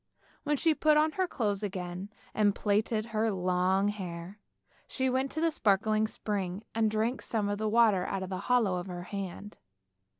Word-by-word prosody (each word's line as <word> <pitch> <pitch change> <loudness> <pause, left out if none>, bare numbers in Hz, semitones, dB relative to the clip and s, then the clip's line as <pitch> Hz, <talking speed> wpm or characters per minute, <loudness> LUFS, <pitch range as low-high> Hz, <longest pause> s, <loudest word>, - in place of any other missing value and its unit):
When 295 -1 0
she 325 - +2
had 310 - -2
put 305 -1 +5
on 310 +1 +3
her 370 +2 0
clothes 210 - -1
again, 185 -1 -4 0.2
and 205 -2 +3
plaited 215 +1 +1
her 220 +1 +2
long 185 +1 +1
hair, 185 -1 -6 0.5
she 260 -1 -1
went 260 +2 0
to 315 - -1
a 330 - +2
sparkling 215 -4 +2
spring 200 -2 -3
and 225 -1 +2
drank 220 +4 0
some 215 -3 -1
of 205 0 -2
the 215 0 0
water 215 -5 +4
out 195 -1 -2
of 185 - -6
the 185 - -2
hollow 225 -7 +3
of 175 +1 -5
her 175 -1 -6
hand. 200 +1 -6
210 Hz, 190 wpm, -30 LUFS, 190-225 Hz, 0.5 s, put